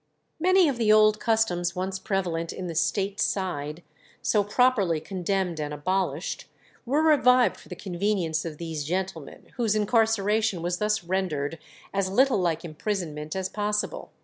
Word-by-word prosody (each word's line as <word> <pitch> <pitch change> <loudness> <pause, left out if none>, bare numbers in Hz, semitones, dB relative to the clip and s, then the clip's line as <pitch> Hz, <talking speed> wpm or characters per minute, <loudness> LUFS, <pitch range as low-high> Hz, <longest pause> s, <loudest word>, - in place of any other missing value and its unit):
Many 370 +1 +5
of 275 -4 -1
the 215 -2 +3
old 215 0 +5
customs 180 -7 +1
once 190 +1 -3
prevalent 175 -4 -2
in 185 - -6
the 170 - -4
State 190 +5 0
Side, 170 -4 -2 0.4
so 210 -2 +3
properly 205 -6 +2
condemned 185 0 -2
and 150 -1 -3
abolished, 170 +1 -2 0.4
were 290 +5 +2
revived 255 -5 +5
for - - -16
the - - -6
convenience 180 -3 -1
of 160 -3 -6
these 160 -2 -4
gentlemen, 175 -1 -4
whose 225 -4 +1
incarceration 215 -3 +2
was 175 +1 -1
thus 210 -2 0
rendered 165 -4 -2 0.3
as 195 -1 0
little 255 +3 +3
like 170 -2 -1
imprisonment 155 -2 -4
as 190 -1 -1
possible. 210 - -2
190 Hz, 150 wpm, -26 LUFS, 165-215 Hz, 0.4 s, Many